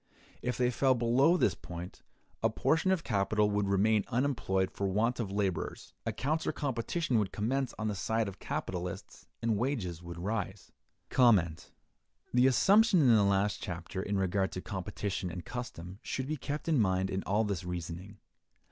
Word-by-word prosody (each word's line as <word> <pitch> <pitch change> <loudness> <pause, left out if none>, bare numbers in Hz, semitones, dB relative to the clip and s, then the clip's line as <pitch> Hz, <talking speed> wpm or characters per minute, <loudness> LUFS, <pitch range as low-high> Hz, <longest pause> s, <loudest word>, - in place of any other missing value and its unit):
If 125 - -2
they 125 -1 +2
fell 130 +1 +3
below 125 +8 +4
this - - +3
point, 90 +1 -8 0.4
a - - +3
portion 160 +4 +1
of 185 -3 +2
capital 105 0 +1
would 100 -1 +1
remain 105 +2 +3
unemployed 120 -8 0
for 100 - -2
want 110 +6 +1
of 110 -5 -2
laborers; 100 -3 -2
a - - +1
counter 155 +4 -1
competition 135 0 -1
would 100 -4 -1
commence 130 +5 -1
on 110 - -2
the 105 - 0
side 110 +3 0
of 100 - -8
capitalists, 90 -1 -5 0.2
and 115 -2 +2
wages 105 - -2
would 85 -1 -8
rise. 95 0 -3 0.4
The 120 +3 +1
assumption 200 - +5
in 125 -5 +6
the 105 -2 +5
last 100 0 +1
chapter 90 +1 -5
in 100 +1 -1
regard 95 0 +1
to - - -3
competition 95 0 -3
and 85 0 -7
custom 95 -6 -7
should 130 - -3
be 155 +3 -2
kept 150 +2 -5
in 155 -5 +3
mind 95 -1 +1
in 95 - -1
all 105 +3 +2
this 100 -4 -2
reasoning. 90 +3 -6
105 Hz, 165 wpm, -31 LUFS, 95-125 Hz, 0.4 s, in